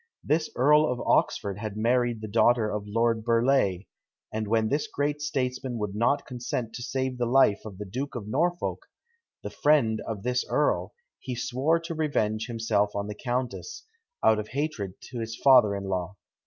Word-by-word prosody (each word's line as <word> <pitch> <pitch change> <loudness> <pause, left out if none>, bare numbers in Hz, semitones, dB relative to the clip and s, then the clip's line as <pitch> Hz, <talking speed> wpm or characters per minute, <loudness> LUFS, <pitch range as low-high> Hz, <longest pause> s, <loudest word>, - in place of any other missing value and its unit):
This 155 +1 +1
Earl 150 +2 +4
of 125 - -3
Oxford 100 0 +1
had 105 -1 -5
married 120 0 +1
the 110 - -5
daughter 115 +1 +3
of 105 -1 -3
Lord 115 +1 +1
Burleigh, 115 -5 +2 0.5
and 110 -1 -2
when 110 +1 +2
this 145 +5 0
great 145 +1 -2
statesman 130 -4 -2
would 105 -3 -3
not 120 +7 +1
consent 120 -2 -4
to 120 - -6
save 130 0 -2
the 120 - +1
life 120 -5 +4
of 100 -4 -8
the 105 - -6
Duke 130 +9 -5
of 110 -4 -5
Norfolk, 175 +9 0 0.6
the - - -5
friend 135 -8 +2
of 105 -3 -4
this 125 0 0
earl, - - 0 0.2
he 125 -3 -5
swore 135 +7 +1
to 165 0 -5
revenge 110 -9 -1
himself 115 -3 0
on 100 0 -2
the 105 - -5
countess, 125 - -4 0.4
out 110 - +5
of 105 - -4
hatred 130 -9 -3
to 125 - -8
his 115 0 -4
father 125 -7 +5
in 100 - -4
law. 95 0 -3
120 Hz, 180 wpm, -27 LUFS, 105-135 Hz, 0.6 s, out